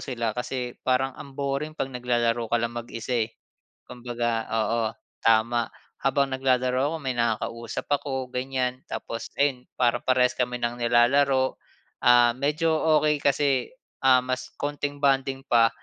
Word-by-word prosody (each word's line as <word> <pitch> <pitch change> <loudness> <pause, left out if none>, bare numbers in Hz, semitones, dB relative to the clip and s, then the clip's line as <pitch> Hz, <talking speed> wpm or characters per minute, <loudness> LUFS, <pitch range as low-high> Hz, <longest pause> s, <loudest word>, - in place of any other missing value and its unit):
sila 120 -4 -2
kasi 125 0 -4
parang 130 +1 +1
ang 140 -2 -10
boring 140 +2 -2
pag 135 - -2
naglalaro 120 -2 0
ka 120 - +2
lang 115 0 -2
mag-isa, 115 0 -2
eh. - - -28 0.5
Kumbaga, 120 -2 -3
oo, 115 +1 0 0.4
tama. 115 +1 +3 0.3
Habang 135 0 +2
naglalaro 130 +2 +1
ako, - - -1
may 130 -2 -1
nakakausap 115 0 -2
ako 135 -3 -1
ganyan 130 0 -2
tapos 115 -1 -5
ayun 135 -3 +1
parang 120 -1 +2
parehas 125 -1 +4
kami 125 -1 0
ng 120 0 -2
nilalaro, 130 +3 +3 0.5
ah, 120 -1 +6
medyo 150 +4 +1 0.3
okey 150 -1 +3
kasi, 140 -2 +2 0.4
ah, 130 -1 +6
mas 130 0 -3
konting 145 0 -2
bonding 135 -1 +2
pa 115 -2 +5
125 Hz, 140 wpm, -26 LUFS, 120-135 Hz, 0.5 s, ah